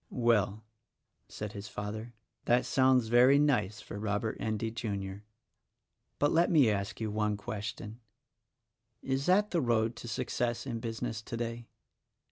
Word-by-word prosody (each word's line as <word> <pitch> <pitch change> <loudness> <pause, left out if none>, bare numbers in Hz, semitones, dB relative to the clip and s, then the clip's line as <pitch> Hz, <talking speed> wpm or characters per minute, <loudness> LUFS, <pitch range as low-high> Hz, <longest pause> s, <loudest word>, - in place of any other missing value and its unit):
"Well," 110 -3 +1 0.6
said 105 -1 -6
his 100 0 -7
father, 110 +3 -6 0.3
"that 120 +1 +3
sounds 130 -1 +4
very 125 +4 +6
nice 120 -9 +1
for 100 - -7
Rob 105 +1 -1
ert 110 - -2
Endy, 110 +1 -2
Jr.; 100 -4 -4 1.0
but 145 - +2
let 170 +2 +4
me 140 -9 +5
ask 100 -1 -3
you 110 -2 -2
one 105 -1 0
question: 110 0 -6 1.0
Is 135 +1 -1
that 205 +3 +4
the 170 - +2
road 115 -2 +1
to - - -8
success 120 +1 -2
in 120 -4 -3
business 115 0 -4
today?" 115 +1 -5
115 Hz, 140 wpm, -31 LUFS, 105-125 Hz, 1.0 s, very